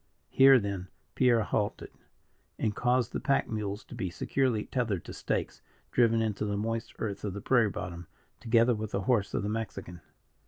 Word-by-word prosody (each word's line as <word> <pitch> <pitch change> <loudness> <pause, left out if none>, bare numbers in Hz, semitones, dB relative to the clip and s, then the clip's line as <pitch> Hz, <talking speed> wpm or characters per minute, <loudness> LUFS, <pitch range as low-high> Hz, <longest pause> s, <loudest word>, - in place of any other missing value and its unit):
Here, 135 0 +8
then, 100 -4 -3 0.3
Pierre 120 -3 +3
halted, 105 0 -2 0.7
and 105 -2 -1
caused 125 -1 +1
the - - -1
pack 135 - +1
mules 105 -1 -4
to - - -13
be 115 -7 -3
securely 120 +3 0
tethered 110 - -2
to - - -8
stakes - - -3 0.3
driven 115 -2 +3
into 105 -2 -2
the 105 -1 -1
moist 115 +2 -3
earth 105 -3 -4
of 100 -3 -3
the 100 - -5
prairie 120 -3 +3
bottom, 85 -3 -6 0.3
together 115 +1 +3
with 110 -1 -4
the 100 - 0
horse 105 -1 +1
of - - 0
the 100 - -2
Mexican. 105 -6 -5
110 Hz, 180 wpm, -29 LUFS, 100-120 Hz, 0.7 s, Here